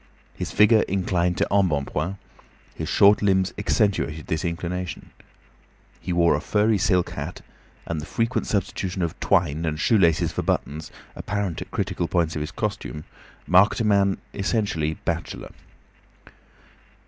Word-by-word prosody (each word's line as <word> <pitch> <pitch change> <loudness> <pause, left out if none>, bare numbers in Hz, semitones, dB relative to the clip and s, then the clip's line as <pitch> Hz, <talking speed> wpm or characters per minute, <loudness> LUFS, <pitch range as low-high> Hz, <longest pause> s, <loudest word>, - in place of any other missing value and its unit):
His - - -5
figure 105 +1 +5
inclined 90 -2 0
to - - +1
embonpoint; 90 -1 0 0.6
his - - -5
short 100 +1 +5
limbs 95 -2 +2
accentuated 100 -7 0
this 80 - -2
inclination. 90 +1 -4 0.9
He - - -5
wore 85 -1 +4
a - - 0
furry 105 0 +2
silk 90 -1 +2
hat, - - -6 0.4
and 80 -2 -3
the 75 - -8
frequent 115 +2 -1
substitution 95 -2 -2
of 85 - -3
twine 80 -2 +1
and 80 -2 -2
shoe 110 +6 +3
laces 85 -4 +3
for - - -2
buttons, 75 +2 -2 0.3
apparent 100 -4 -3
at - - -7
critical 95 -3 -2
points 85 -2 0
of 75 - -3
his 75 - -3
costume, 75 -1 -4 0.4
marked 95 +4 +4
a - - +1
man 100 -2 +3 0.2
essentially 100 -7 -1
bachelor. - - -3
90 Hz, 140 wpm, -24 LUFS, 80-100 Hz, 0.9 s, figure